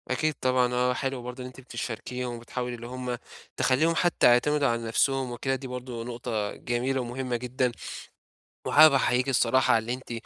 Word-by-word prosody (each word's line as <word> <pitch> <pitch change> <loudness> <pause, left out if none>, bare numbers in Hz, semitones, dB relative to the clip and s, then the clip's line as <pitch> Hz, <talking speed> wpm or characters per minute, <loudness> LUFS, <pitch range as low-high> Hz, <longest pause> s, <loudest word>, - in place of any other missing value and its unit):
أكيد 155 +5 +1
طبعًا. 125 -1 +2
آه، 125 +1 +2
حلو 135 0 -3
برضه 125 +1 -7
إن - - -6
أنتِ 130 +1 -12
بتشاركيهم 125 0 -5
وبتحاولي 125 +1 -5
اللي 120 0 -9
هم 125 0 -4 0.4
تخلّيهم 155 +6 +2
حتّى 175 +1 +3
يعتمدوا 140 +4 +4
على 115 -1 -1
نفسهم 130 +3 +1
وكده، 135 +3 -1
دي 130 0 -7
برضه 125 -2 -6
نقطة 115 -3 -3
جميلة 125 +2 -1
ومهمة 125 +1 -3
جدًا 125 +1 -1 1.0
وحابب 155 -1 +7
أحييكِ 130 0 +2
الصراحة 130 -1 +3
على 115 +1 0
إن 125 - -3
أنتِ - - -5
125 Hz, 170 wpm, -27 LUFS, 120-130 Hz, 1.0 s, وحابب